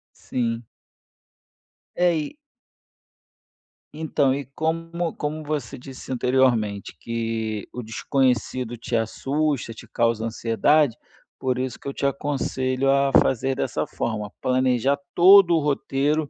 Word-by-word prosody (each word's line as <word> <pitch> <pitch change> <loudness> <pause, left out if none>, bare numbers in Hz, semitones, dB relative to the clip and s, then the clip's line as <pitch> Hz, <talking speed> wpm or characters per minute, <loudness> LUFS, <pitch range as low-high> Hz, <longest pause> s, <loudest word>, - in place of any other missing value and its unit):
Sim. 115 -2 -3 1.3
É, 175 -1 +3
e - - -15 1.6
Então, 150 -3 +1
e 140 -1 -3
como 165 +1 -2
como 155 +1 -3
você 145 -5 -4
disse 130 +1 -10
anteriormente, 120 -5 +1
que 115 -2 -3
o 125 - -5
desconhecido 125 +1 0
te 115 +1 -3
assusta, 135 +3 -1
te - - -12
causa 115 -1 0
ansiedade, 115 +4 +2 0.4
por 130 -1 0
isso 130 -1 -3
que - - -10
eu 140 - -3
te - - -3
aconselho 135 -1 -1
a 140 0 +3
fazer 135 +1 0
dessa - - -1
forma, 105 -3 -3
planejar 130 +1 +2 0.2
todo 185 -1 +7
o 160 - +3
roteiro 145 +1 0
130 Hz, 120 wpm, -24 LUFS, 115-145 Hz, 1.6 s, todo